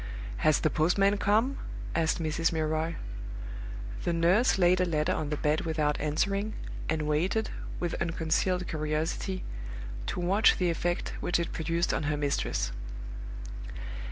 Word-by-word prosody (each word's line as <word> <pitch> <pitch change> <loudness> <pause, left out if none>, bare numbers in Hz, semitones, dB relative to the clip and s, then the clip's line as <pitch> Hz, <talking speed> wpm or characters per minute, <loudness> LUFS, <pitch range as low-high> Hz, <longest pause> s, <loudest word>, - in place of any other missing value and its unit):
"Has 155 -1 +4
the 155 - +2
postman 195 +6 +3
come?" 225 +8 +3 0.3
asked 165 +1 +2
Mrs. 165 0 +1
Milroy. 160 +1 0 1.1
The 170 - +1
nurse 180 +10 +4
laid 180 0 +5
a - - +4
letter 165 +1 +1
on 155 -4 -2
the 150 - -1
bed 150 +1 +2
without 155 -2 0
answering, 195 +8 0 0.4
and 160 -1 +1
waited, 170 +9 +1 0.3
with 175 -1 -1
unconcealed 170 +2 +1
curiosity, 155 +5 -1 0.6
to - - -2
watch 190 +5 +5
the 180 -2 +2
effect 175 +1 -1
which 175 - +1
it 170 - -1
produced 165 +2 0
on - - +1
her 150 - +1
mistress. 145 -1 0
165 Hz, 135 wpm, -30 LUFS, 155-185 Hz, 1.1 s, laid